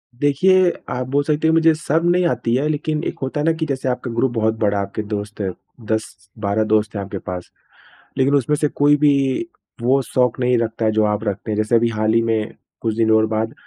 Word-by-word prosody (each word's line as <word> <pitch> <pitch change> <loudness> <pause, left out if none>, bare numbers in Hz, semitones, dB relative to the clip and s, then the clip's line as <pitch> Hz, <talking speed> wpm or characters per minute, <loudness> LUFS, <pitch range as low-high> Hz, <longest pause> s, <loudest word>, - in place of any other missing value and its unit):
देखिए, 175 +7 +3 0.2
आप 125 0 -3
बोल 145 +1 +1
सकते 155 +2 0
हैं 160 - +3
मुझे 165 0 +5
शर्म 160 +1 -1
नहीं 180 0 +3
आती 120 -6 0
है 145 +4 +1
लेकिन, 155 +1 -2
एक - - -4
होता 135 +2 -3
है 150 - 0
ना 165 - +4
कि 160 0 -3
जैसे 130 -3 -2
आपका 125 -1 -3
ग्रुप 120 +2 0
बहुत 110 -1 +1
बड़ा 100 -2 +1
आपके 100 +2 -3
दोस्त 105 0 -5
है। 95 - -1 0.4
10-12 100 0 -2
दोस्त 110 0 +1
हैं 100 - -2
आपके 95 - -6
पास। 90 -1 -7 0.7
लेकिन 135 +2 +2
उसमें 140 +2 +2
से 150 - +1
कोई 145 +1 +3
भी 145 0 +4 0.7
वो 130 +3 +3
शौक़ 125 -1 0
नहीं 125 0 +2
रखता 115 -1 -2
है 110 - +3
जो 110 0 +2
आप 105 0 -1
रखते 100 +1 -3
हैं। 105 - 0
जैसे 110 +2 +1
अभी 115 0 +3
हाल 110 0 0
ही 115 - +4
में 110 -1 -1 0.3
कुछ 110 -2 -1
दिन 110 -1 +2
और 110 0 +4
बाद 110 +1 -1
115 Hz, 230 wpm, -20 LUFS, 110-145 Hz, 0.7 s, मुझे